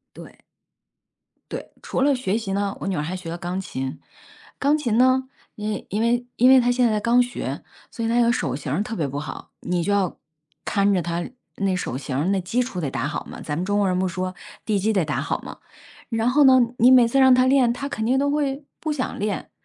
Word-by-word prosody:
对。 - - -13 1.1
对， - - -6
除 - - -2
了 280 +1 +4
学 225 -5 -1
习 200 -4 -4
呢， 200 0 -1
我 - - -4
女 190 - -1
儿 150 - -1
还 170 +5 -4
学 180 -3 -7
了 170 - -4
钢 180 +1 -3
琴。 135 -7 -5 0.6
钢 285 +2 +3
琴 235 -6 0
呢， 260 +1 +4 0.3
因 210 0 -3
为 210 - -5
因 210 - -1
为 240 +2 +1
因 250 +2 +5
为 265 -1 +8
她 245 0 +2
现 245 -2 +3
在 215 - +1
刚 235 +3 +4
学， 245 0 -5 0.3
所 230 - -5
以 - - 0
她 235 +1 +2
有 235 0 +4
手 135 - -1
型 135 - -5
儿 180 +8 +1
特 225 +1 -5
别 150 - 0
不 140 +1 -5
好， 150 - -7
你 175 -1 -1
就 205 - 0
要 195 -3 +1 0.5
看 200 0 +2
着 180 - +1
她 170 +1 -3 0.3
那 195 -2 0
手 130 -8 -3
型 140 +5 -2
那 195 - +1
基 225 +8 0
础 215 -7 -5
得 145 -5 -2
打 130 +2 -2
好 - - -4
嘛， - - -9
咱 150 -1 -3
们 175 - -1
中 205 +2 0
国 205 - +2
人 180 0 0
不 185 - +1
说” 185 +1 -4 0.3
地 210 -2 +1
基 215 +3 +1
得 190 -5 +2
打 150 - -2
好 - - -2
“嘛。 - - -9 0.5
然 225 0 0
后 290 +2 +4
呢， 260 -1 +7 0.2
你 245 +3 +6
每 250 -2 +7
次 270 +4 +1
让 260 -1 +7
她 255 0 +4
练， 260 -3 +4
她 270 +3 -5
肯 220 -5 -3
定 260 +2 +2
都 285 +1 +1
会 285 -1 -1 0.2
不 310 - -2
想 265 -4 -3
练。 205 0 -3
210 Hz, 265 characters per minute, -23 LUFS, 180-250 Hz, 1.1 s, 为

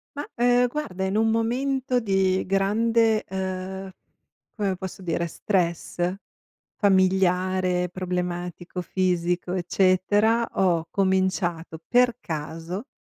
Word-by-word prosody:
Mah, 290 +1 -5
uhm, 245 +1 +4
guarda, 240 -9 -4
in 190 +1 -1
un 225 0 +3
momento 250 +3 0
di 190 -4 +1
grande 220 +3 +2
uhm, 190 0 -4 0.6
come 200 -3 -1
posso 190 0 -7
dire, 170 0 -1
stress, 175 -1 -1 0.6
familiare, 185 -2 +2
problematico, 180 0 -4
fisico, 180 -1 -1
eccetera, 195 +5 +2
ho 170 -3 +2
cominciato 185 -4 0
per 245 -1 +3
caso, 165 - -5
190 Hz, 95 wpm, -25 LUFS, 180-215 Hz, 0.6 s, uhm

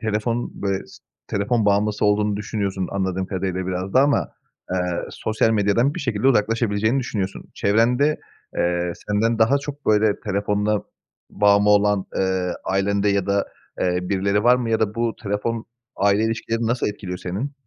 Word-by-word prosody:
telefon 115 +2 -1
böyle 100 -1 -1
s - - -15 0.3
telefon 105 +3 0
bağımlısı 105 +1 +2
olduğunu 105 0 +2
düşünüyorsun 100 -3 -3
anladığım 95 -1 -1
kadarıyla 95 -1 -3
biraz 95 +1 -3
da 130 - +7
ama, 145 0 +2 0.4
eee, 95 - +1 0.3
sosyal 110 +1 0
medyadan 110 +6 +2
bir - - -4
şekilde 125 -3 -1
uzaklaşabileceğini 110 +1 +2
düşünüyorsun. 100 -6 -4
Çevrende, 125 +8 +2 0.4
eee, 85 0 0 0.2
senden 110 +2 +1
daha 115 +5 +4
çok 145 +1 -8
böyle 105 -1 +3
telefonuna 105 0 0 0.5
bağımlı 100 0 +4
olan, 105 -1 +3
eee, 95 -1 0
ailende 100 +1 +1
ya 100 -2 +1
da, 100 0 +1 0.3
eee, 90 0 +1
birileri 100 +2 0
var 125 +1 +6
mı 120 -2 -2
ya 110 - +1
da 105 -1 0
bu 115 0 -1
telefon, 110 +2 -2 0.3
aile 100 +2 +3
ilişkilerini 115 0 -1
nasıl 120 +2 0
etkiliyor 95 -3 -6
senin? 100 +11 -4
105 Hz, 155 wpm, -22 LUFS, 100-115 Hz, 0.5 s, da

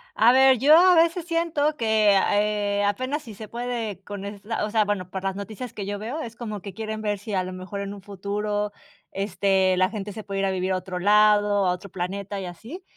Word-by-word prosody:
A 230 +3 +6
ver, 265 0 +6
yo 290 +6 +7
a 365 +1 +7
veces 335 +1 +3
siento 330 -3 0
que 220 -2 +3
a 205 +1 +2
eh, 205 -1 0
apenas 255 +9 -1
si 225 - -10
se 215 +2 -9
puede 230 -5 -4
con 205 -1 -7
esta 205 +2 -4
o - - -4
sea, 215 0 +3
bueno, 200 -3 -2
por 190 0 -5
las 195 -1 -1
noticias 215 +4 -6
que 200 - -5
yo 205 0 -4
veo, 245 +9 -4
es 230 -4 -7
como 215 -4 -6
que 195 0 -8
quieren 220 0 -5
ver 210 -1 -1
si 205 +2 -7
a 185 -1 +1
lo 185 0 -6
mejor 185 +2 -6
en 200 0 -4
un 200 - -10
futuro, 205 +1 -3 0.4
este, 190 -1 +1
la 185 0 +3
gente 210 -1 -5
se 215 +1 -8
puede 195 -1 -3
ir 195 - +1
a 195 - +1
vivir 185 0 -1
a - - +1
otro 185 0 -5
lado, 205 0 +4
a 180 - +3
otro 180 +2 -6
planeta 195 +3 -4
y 185 - -5
así. 230 - -9
205 Hz, 240 wpm, -24 LUFS, 195-225 Hz, 0.4 s, yo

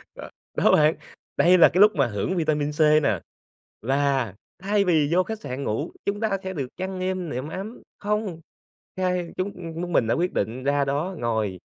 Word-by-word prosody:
Ừ, - - -8 0.3
đó - - +4
bạn, 155 +1 +4 0.4
đây 180 +2 +6
là 170 - +8
cái 185 - +2
lúc 210 +1 +6
mà 140 -4 +2
hưởng 105 - -2
vitamin 150 -3 0
C 150 - -11 0.2
nè, 105 -7 +1 0.6
là 135 -3 0 0.3
thay 200 +2 +1
vì 155 -5 +3
vô 185 +1 +4
khách 220 +2 -6
sạn 130 -3 -5
ngủ, 135 +8 -2
chúng 200 +1 -1
ta 220 - +1
sẽ 190 0 -4
được 140 -6 -3
chăn 185 +1 -4
êm 185 -2 -2
nệm 130 +3 -4
ấm. 200 +8 -7 0.2
Không! 205 -5 -2 0.6
Hai 180 -2 -1
chúng 190 +2 -2 0.3
chúng 175 0 -4
mình 120 - +3
đã 115 - +2
quyết 180 +2 0
định 115 +6 -2
ra 140 0 +2
đó 145 +7 -2
ngồi. 110 -5 -1
160 Hz, 195 wpm, -24 LUFS, 135-185 Hz, 0.6 s, là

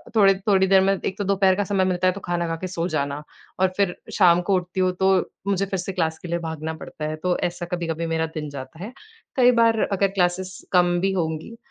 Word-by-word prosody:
थोड़े 200 -3 +6
थोड़ी 190 -2 +4
देर 190 0 +5
में 195 +1 +3
एक 190 - -2
तो 205 - -2
दोपहर 195 -1 +3
का 205 - 0
समय 195 -1 +1
मिलता 185 0 +1
है 185 - +3
तो 200 - -7
खाना 175 -1 -1
खा 165 - -2
के 185 - -3
सो 175 -1 -2
जाना, 145 -2 -2 0.4
और 185 0 +2
फिर 195 -3 +1 0.2
शाम 175 -3 +5
को 195 - +4
उठती 180 +1 -3
हूँ 185 - +3
तो 190 0 +4 0.3
मुझे 195 -1 +1
फिर 195 -1 -3
से 180 +2 -4
क्लास 160 -3 -1
के 180 - -8
लिए 170 0 -1
भागना 160 0 -4
पड़ता 150 - -7
है 155 - -3
तो 180 -1 +1
ऐसा 175 0 -7
कभी-कभी 165 -1 -2
मेरा 160 0 +1
दिन 150 -2 -4
जाता 140 +4 -9
है। 230 +5 -7 0.4
कई 250 -1 +6
बार 225 -1 +3
अगर 195 0 +2
क्लासेस 185 -1 -1 0.2
कम 175 -1 +4
भी 195 +1 +1
होंगी 160 +5 -3
185 Hz, 240 wpm, -23 LUFS, 170-195 Hz, 0.4 s, थोड़े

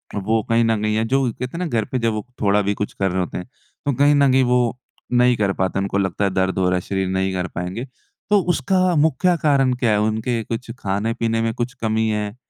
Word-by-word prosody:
वो 110 +3 0
कहीं 115 0 +3
न 115 -2 +1
कहीं 105 0 0
या 110 - +1
जो 135 - +3
कहते 125 +7 -6
ना 180 - -2
घर 115 -9 -1
पर 130 - -3
जब 115 -2 +1
वो 105 -1 -4 0.2
थोड़ा 105 -1 +3
भी 100 0 0
कुछ 105 0 -4
कर 95 -1 -1
रहे 95 - -1
होते 90 - -3
हैं, 90 - -7 0.4
तो 140 - +1
कहीं 145 +3 +4
न 140 -2 +4
कहीं 130 0 +4
वो 125 -1 +1 0.3
नहीं 125 0 +4
कर 100 -2 +1
पाते, 95 +1 -1
उनको 100 0 -1
लगता 95 0 -1
है - - +2
दर्द 95 0 0
हो 90 -1 +2
रहा 90 - +1
है, - - -2
शरीर 95 +1 -2
नहीं 95 0 -1
कर 90 -1 -2
पाएँगे, 90 +8 -4 0.4
तो 210 -1 +5
उसका 185 0 +2
मुख्य 160 +4 +3
कारण 135 -4 +3
क्या 120 -4 +2
है, 105 - +2
उनके 110 +2 -1
कुछ 115 +2 -5
खाने-पीने 115 +3 -1
में 115 0 0
कुछ 120 +2 -3
कमी 110 0 +1
है 105 0 -2
110 Hz, 245 wpm, -21 LUFS, 100-125 Hz, 0.4 s, तो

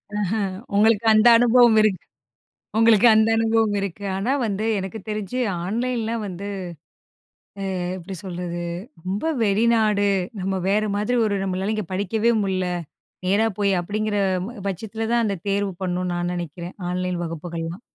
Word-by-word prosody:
ஆஹ, 205 -3 0 0.5
உங்களுக்கு 220 +1 +3
அந்த 215 +2 +5
அனுபவம் 240 -1 +5
இருக்கு 210 -4 +2 0.8
உங்களுக்கு 225 0 +6
அந்த 220 +1 +4
அனுபவம் 225 -2 +2
இருக்கு. 200 +1 -5
ஆனா, 200 +7 -1
வந்து 210 0 -2
எனக்கு 195 +3 -5
தெரிஞ்சு 215 +3 -3 0.3
ஆன்லைன்லாம் 230 +1 -2
வந்து, 195 +1 -6 1.3
அ 180 - -2
எப்பிடி 190 +2 -7
சொல்றது 175 -2 -4 0.4
ரொம்ப 190 +3 -2 0.2
வெளிநாடு 215 -1 +3 0.3
நம்ம 190 +1 -1
வேற 210 +2 +2
மாதிரி 210 +5 0
ஒரு 205 -2 0
நம்மளால 190 +2 -1
இங்க 215 -2 -3
படிக்கவே 210 +4 +1
முடியல, 185 -2 -1 0.6
நேரா 205 +4 +3
போய் 200 -1 +2
அப்பிடிங்கிற 210 +3 -2 0.3
ப - - -6 0.2
பட்சத்தில 220 +4 -4
தான் 235 -1 +3
அந்த 200 -2 -1
தேர்வு 200 0 0
பண்ணு 180 -1 -1
நான் 175 0 -1
நினைக்கிறேன். 175 0 -6
ஆன்லைன் 180 -1 -2
வகுப்புகள்லாம். 165 +2 -5
205 Hz, 135 wpm, -23 LUFS, 185-220 Hz, 1.3 s, உங்களுக்கு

